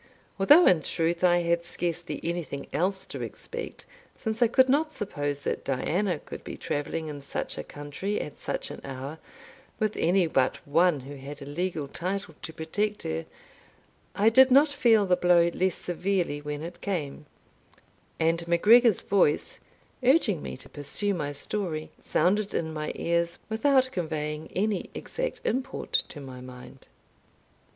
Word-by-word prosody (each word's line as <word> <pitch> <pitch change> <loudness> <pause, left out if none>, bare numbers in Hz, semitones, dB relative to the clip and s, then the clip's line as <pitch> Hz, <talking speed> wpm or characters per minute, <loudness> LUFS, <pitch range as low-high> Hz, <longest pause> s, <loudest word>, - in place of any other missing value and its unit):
Although 295 - +7
in 170 -4 +5
truth 170 +2 -1
I 175 -1 +4
had 170 0 +1
scarcely 175 0 -3
anything 165 -4 -3
else 190 +5 0
to - - -6
expect, - - -7 0.3
since 220 +1 -3
I 240 - +7
could 260 +3 +4
not 305 +4 +2
suppose 145 -8 -3
that - - -2
Diana 170 +7 0
could - - -10
be - - -7
travelling 155 +3 -3
in 150 -2 -6
such 140 - -3
a - - -5
country, 145 +8 -4
at 150 - -7
such - - -3
an - - -8
hour, 135 +4 -6 0.6
with 215 -2 0
any 180 +2 +3
but 135 -5 +1
one 165 0 +3
who 140 +2 -9
had 140 +2 -8
a - - -8
legal 155 0 -2
title 185 +3 -3
to - - -6
protect 205 +7 -2
her, 80 +1 -3 0.9
I 210 +3 +5
did 260 +3 +7
not 280 +4 +6
feel 235 -7 +4
the 180 -1 +4
blow 175 -1 +4
less 185 -1 +1
severely 175 -4 -1
when 150 0 -5
it 170 +1 -8
came; 155 -6 -3 0.9
and 165 +1 +1
MacGregor's 215 +6 +5
voice, 185 -7 +2 0.4
urging 245 - +3
me - - -6
to - - -12
pursue 190 +8 -2
my 150 -5 -2
story, 155 +1 -3
sounded 205 +3 +1
in 160 -1 -1
my 150 -1 -3
ears 170 0 0
without 260 +3 +3
conveying 155 - -3
any 205 0 0
exact - - -3
import 265 +2 -2 0.2
to 150 - -9
my 130 -2 -9
mind. 125 0 -12
170 Hz, 155 wpm, -27 LUFS, 150-205 Hz, 0.9 s, Although